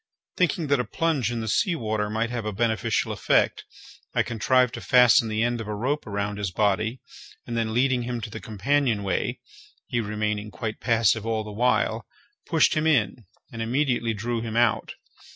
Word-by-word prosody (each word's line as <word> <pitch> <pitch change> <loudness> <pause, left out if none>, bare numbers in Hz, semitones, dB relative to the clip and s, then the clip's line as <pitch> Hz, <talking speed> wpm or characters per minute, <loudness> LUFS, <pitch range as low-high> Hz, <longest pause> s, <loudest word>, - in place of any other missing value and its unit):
Thinking 175 -2 +1
that 140 -2 +2
a - - +1
plunge 140 -1 0
in 115 -1 -3
the 110 - -4
sea 185 - +1
water 110 -6 -2
might 110 +2 -1
have 120 -2 -3
a 105 - -3
beneficial 110 +1 0
effect, - - +1 0.5
I - - +3
contrived 125 +2 +2
to 120 - -6
fasten 125 -2 +5
the 110 +1 0
end 120 -1 0
of 110 - -7
a 105 - -3
rope 135 +7 -2
around 100 0 -3
his 100 -2 -1
body, 105 +5 0 0.4
and 120 - -5
then, 115 -1 -1
leading 125 +2 +2
him 120 0 -3
to 110 -1 -6
the - - -6
companion 115 +1 0
way 95 -3 -2 0.4
(he 120 - -1
remaining 105 0 -2
quite 110 +1 -5
passive 115 -2 +2
all 110 -1 -1
the 105 - -8
while), 125 +4 +1 0.4
pushed - - +3
him 155 +1 +1
in, 120 - +1 0.2
and 115 - -6
immediately 120 -1 0
drew 115 +2 -2
him 115 0 -4
out. 120 -3 +1
115 Hz, 190 wpm, -25 LUFS, 105-125 Hz, 0.5 s, fasten